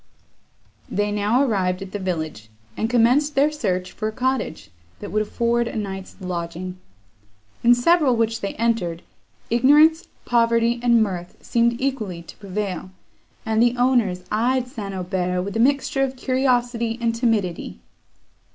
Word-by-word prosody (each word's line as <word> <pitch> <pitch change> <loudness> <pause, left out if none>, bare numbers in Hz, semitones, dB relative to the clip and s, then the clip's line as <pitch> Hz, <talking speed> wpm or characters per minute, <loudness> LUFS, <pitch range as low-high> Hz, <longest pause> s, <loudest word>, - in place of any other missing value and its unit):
They 205 0 0
now 210 +6 +2
arrived 190 -6 0
at 190 - -10
the 205 - -4
village, 155 - -4 0.3
and 220 - -1
commenced 250 +5 +3
their 285 +3 +4
search 185 -11 -2
for 215 - -4
a - - -2
cottage, 250 - -2 0.3
that - - -7
would 215 - +1
afford 235 +2 0
a - - -6
night's 195 -3 -5
lodging. 180 0 -5 0.8
In 240 +1 +6
several, 285 0 +3
which 225 0 0
they 200 - -3
entered, 210 -7 -1 0.5
ignorance, 295 +7 +5 0.2
poverty, 235 0 +2
and 235 -2 +4
mirth 180 -4 -5
seemed 235 0 +1
equally 220 -11 -3
to - - -13
prevail; 200 -2 -4 0.6
and 220 0 +1
the 240 +1 +3
owners 240 -8 +2
eyed 245 +4 +1
St. 215 -6 -6
Aubert 180 -1 -1
with 200 +1 -5
a - - 0
mixture 275 +2 +2
of 270 -1 0
curiosity 245 -3 0
and 230 -1 0
timidity. 225 -7 -1
225 Hz, 145 wpm, -22 LUFS, 190-245 Hz, 0.8 s, In